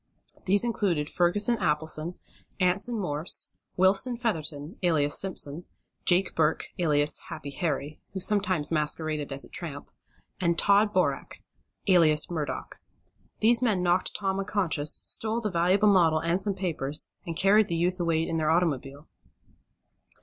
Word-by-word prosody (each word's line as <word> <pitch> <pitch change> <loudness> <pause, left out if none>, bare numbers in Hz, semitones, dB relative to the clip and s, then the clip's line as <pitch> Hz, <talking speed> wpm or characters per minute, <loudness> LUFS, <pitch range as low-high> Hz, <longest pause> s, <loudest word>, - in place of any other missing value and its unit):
These 200 +3 +4
included 185 -10 -1
Ferguson 205 +7 +2
Appleson, 160 -1 -1 0.4
Anson 195 +6 +1
Morse, 155 -3 0 0.3
Wilson 195 +7 +2
Featherton, 160 - -2
alias 155 -5 +2
Simpson, 175 -4 -3 0.4
Jake 180 +1 +2
Burke, 160 -1 0
alias 150 -3 +2
Happy 140 - -7
Harry, 150 -1 -4
who 190 - -4
sometimes 185 -6 +1
masqueraded 155 -1 -1
as 135 0 +2
a - - -17
tramp, 150 -5 -4 0.5
and 170 -2 0
Tod 205 +2 +3
Boreck, 180 -8 -2 0.4
alias 165 -4 +4
Murdock. 155 -4 -5 0.6
These 230 +2 +5
men 210 -7 0
knocked 180 +1 +1
Tom 195 -1 -1
unconscious, 185 -7 0
stole 220 +1 0
the 215 -3 -3
valuable 185 +4 +2
model 165 -4 +3
and 170 +4 -1
some 200 -1 0
papers, 155 -6 -1 0.2
and 165 - -4
carried 200 +3 +4
the 170 - -2
youth 180 +2 -1
away 165 -1 0
in 165 - -2
their 155 -1 0
automobile. 145 -4 -1
175 Hz, 135 wpm, -26 LUFS, 155-195 Hz, 0.6 s, These